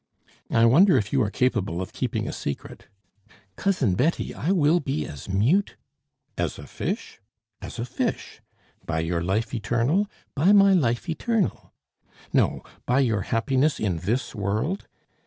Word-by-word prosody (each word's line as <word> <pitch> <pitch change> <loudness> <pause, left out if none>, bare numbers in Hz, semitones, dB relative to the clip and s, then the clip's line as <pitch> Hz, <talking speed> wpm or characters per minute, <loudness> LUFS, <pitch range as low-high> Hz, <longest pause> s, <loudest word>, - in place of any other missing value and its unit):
"I 115 0 +4
wonder 155 - +6
if 110 0 -2
you 135 - +3
are 105 - +1
capable 105 -7 0
of 95 +3 -5
keeping 115 -3 -2
a - - -4
secret." 70 - -6 0.7
"Cousin 185 - +1
Betty, 140 - 0
I 170 - -1
will 170 -2 +4
be 140 0 -2
as 70 +5 -9
mute! 125 - +2 0.3
" - - -50
"As - - -3
a - - -9
fish?" - - -5 0.4
"As - - -8
a 115 - -2
fish." 125 - -3 0.4
"By 80 -1 -2
your 85 +1 -1
life 100 +8 -1
eternal?" 120 - +1 0.3
"By 170 +9 +4
my 200 -1 +6
life 120 -4 +1
eternal!" 210 +5 -1 0.6
"No, - - +2 0.2
by 125 +3 +3
your 115 -6 +1
happiness 135 +8 +1
in 95 -6 0
this 110 +10 -2
world?" 110 - -2
125 Hz, 155 wpm, -25 LUFS, 105-155 Hz, 0.7 s, wonder